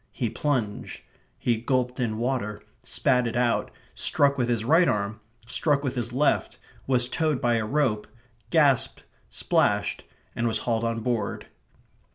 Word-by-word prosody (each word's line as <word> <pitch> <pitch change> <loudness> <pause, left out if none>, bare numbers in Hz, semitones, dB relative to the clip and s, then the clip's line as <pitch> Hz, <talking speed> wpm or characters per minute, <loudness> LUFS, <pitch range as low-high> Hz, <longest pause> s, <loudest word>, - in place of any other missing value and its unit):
He 115 +1 -2
plunged. 125 -9 -2 0.4
He 120 -2 0
gulped 125 +1 -1
in 115 -3 -1
water, 120 -3 -2 0.2
spat 125 -2 +1
it 115 - -4
out, 120 -1 +1 0.2
struck 140 -1 +3
with 125 -3 0
his 115 -2 0
right 165 +7 +5
arm, 105 +1 -1 0.3
struck 140 +4 +1
with 130 -3 -1
his 120 -2 -3
left, 140 +4 +1 0.3
was 125 -2 +3
towed 155 0 0
by 120 -1 +2
a 110 -1 -2
rope, 120 -6 0 0.4
gasped, 140 -5 +3 0.3
splashed, - - +1 0.3
and 120 - 0
was 110 -1 +2
hauled 115 -1 0
on 115 0 -1
board. 120 -1 -2
120 Hz, 150 wpm, -26 LUFS, 115-135 Hz, 0.4 s, right